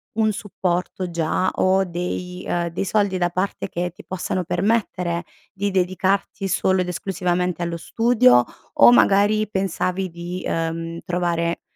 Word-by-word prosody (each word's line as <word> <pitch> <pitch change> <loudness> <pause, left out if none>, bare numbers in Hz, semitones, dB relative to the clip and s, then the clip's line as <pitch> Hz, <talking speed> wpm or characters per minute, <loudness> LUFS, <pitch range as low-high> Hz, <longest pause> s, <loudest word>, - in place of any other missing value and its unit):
un 220 -1 +2
supporto 185 -2 -3
già, 170 +2 0
o 190 +1 +3
dei 180 +1 -4
uhm 170 0 0
dei 170 +3 -3
soldi 200 -1 +1
da 175 -1 +1
parte, 185 +4 -2
che 175 -1 -3
ti - - -14
possano 185 0 -2
permettere 180 -2 0 0.3
di 200 +1 -2
dedicarti 190 +2 0
solo 190 0 +2
ed 180 - -2
esclusivamente 180 -1 -1
allo 170 0 -3
studio, 165 - +4 0.3
o 115 +1 +7
magari 205 - +4
pensavi 190 -1 -1
di, 175 +2 -6
ehm, 165 0 -2
trovare 170 -1 -1
180 Hz, 140 wpm, -22 LUFS, 170-195 Hz, 0.3 s, o